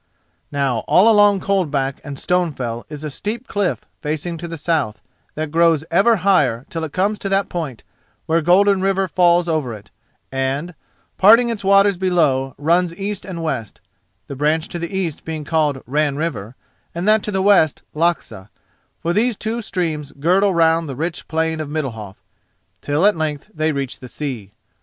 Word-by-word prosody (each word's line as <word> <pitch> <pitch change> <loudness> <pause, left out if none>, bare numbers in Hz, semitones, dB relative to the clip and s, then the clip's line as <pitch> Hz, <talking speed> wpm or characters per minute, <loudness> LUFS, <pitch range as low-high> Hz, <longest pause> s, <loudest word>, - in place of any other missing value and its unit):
Now 135 -5 0
all 195 +5 +5
along 205 -2 +5
Coldback 150 -9 0
and 140 -2 -7
Stonefell 135 -11 -1
is 150 0 -8
a 150 - -4
steep 225 - -5
cliff 205 -6 -1 0.2
facing 155 +3 -3
to 170 - -5
the 165 0 -6
south, 150 -8 -1 0.4
that 155 -1 -3
grows 165 -2 +3
ever 200 +7 +4
higher 135 -11 +3
till 165 -1 -3
it 155 - -4
comes 200 +5 0
to 195 - -4
that 195 0 +1
point 155 -9 -5 0.4
where 165 +1 +2
Golden 190 +4 +4
River 195 0 +1
falls 175 -1 +3
over 150 -8 -1
it 105 0 -15 0.4
and, 135 +6 -2 0.5
parting 230 +5 +7
its 225 -4 -4
waters 195 0 +4
below, 155 -8 +1
runs 170 +3 +1
east 200 +1 -4
and 170 -4 -6
west—the 100 - -7
branch 155 +4 0
to 175 - -5
the 170 0 -4
east 185 -6 -3
being 155 -2 -5
called 150 -4 0
Ran 145 +2 0
River 130 -8 -4 0.4
and 175 +3 -2
that 215 0 +5
to 210 - -4
the 190 -1 0
west 190 -7 +3
Laxà—for 160 - -4
these 225 +2 +1
two 225 +2 -3
streams 165 -8 -3
girdle 185 +7 +2
round 165 -2 +2
the 135 - -5
rich 165 +5 -4
plain 160 0 -1
of 155 -2 -4
Middalhof, 115 -10 -4 0.7
till 145 +6 +1
at 210 - +5
length 155 +4 -3
they 155 0 0
reach 140 -2 -4
the 130 - -10
sea. 120 -9 -6
160 Hz, 170 wpm, -20 LUFS, 145-190 Hz, 0.7 s, parting